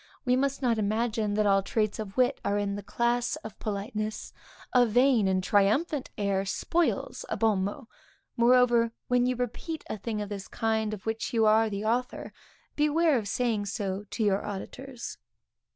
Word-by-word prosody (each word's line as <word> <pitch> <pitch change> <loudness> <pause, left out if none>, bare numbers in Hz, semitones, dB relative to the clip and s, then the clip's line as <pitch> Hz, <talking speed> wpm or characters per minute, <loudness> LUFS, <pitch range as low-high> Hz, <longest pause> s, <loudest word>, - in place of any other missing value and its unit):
We 250 0 +3
must 275 +1 0
not 235 -3 +2
imagine 215 0 0
that 215 0 +2
all 195 -1 +4
traits 215 +1 -1
of 205 -1 -6
wit 255 +2 +2
are 200 - 0
in 200 -1 -1
the 205 - -5
class 240 +6 0
of 220 - -9
politeness; 215 +1 -4 0.4
a 250 -1 +6
vain 245 -2 +4
and 185 -1 +1
triumphant 235 - +2
air 200 -2 0
spoils 335 - -1
a - - -2
bon 215 -4 +2
mot; 205 +3 -5 0.5
moreover, 240 -1 +4 0.2
when 245 0 +3
you 255 - +1
repeat 250 +7 -4
a - - -3
thing 215 +1 -3
of 205 -1 -4
this 200 -2 -6
kind 220 -2 -1
of 190 - -15
which 225 +1 -3
you 225 -1 +4
are 220 +1 +4
the 205 +1 -4
author, 245 +3 -1 0.4
beware 300 +1 +3
of 220 -5 -1
saying 220 -2 0
so 200 -1 -3
to 225 - -2
your 200 -1 +2
auditors. 235 +5 -7
220 Hz, 175 wpm, -28 LUFS, 205-245 Hz, 0.5 s, a